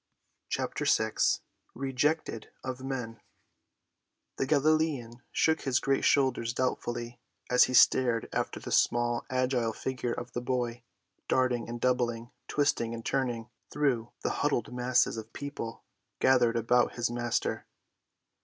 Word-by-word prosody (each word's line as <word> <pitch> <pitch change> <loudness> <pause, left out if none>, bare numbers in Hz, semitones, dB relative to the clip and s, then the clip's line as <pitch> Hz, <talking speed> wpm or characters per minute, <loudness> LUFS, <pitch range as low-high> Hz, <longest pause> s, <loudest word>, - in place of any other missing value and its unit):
CHAPTER - - -2
VI - - +2 0.6
REJECTED 135 -1 -1
OF 130 0 -5
MEN 125 -4 -4 1.2
The 135 - 0
Galilean 145 -5 +1
shook 160 -1 +2
his 130 -3 +1
great 135 0 +1
shoulders 130 -4 +2
doubtfully 120 -2 -2 0.3
as 125 - +7
he 130 - -2
stared 120 -1 +5
after - - -2
the - - -7
small, 120 0 +2
agile 130 -3 0
figure 125 -1 -3
of 120 - -7
the 120 - -2
boy, 120 -1 -2 0.5
darting 125 -3 +1
and 120 0 -5
doubling, 120 -2 0 0.2
twisting 120 -5 0
and 115 - -8
turning 120 -4 -1 0.2
through 125 -6 0
the - - 0
huddled 130 -6 0
masses 125 -1 +2
of 110 0 -8
people 140 -5 -6 0.4
gathered 125 -3 +4
about 120 +2 +2
his 120 0 -1
Master. 120 -1 -2
125 Hz, 125 wpm, -29 LUFS, 120-130 Hz, 1.2 s, as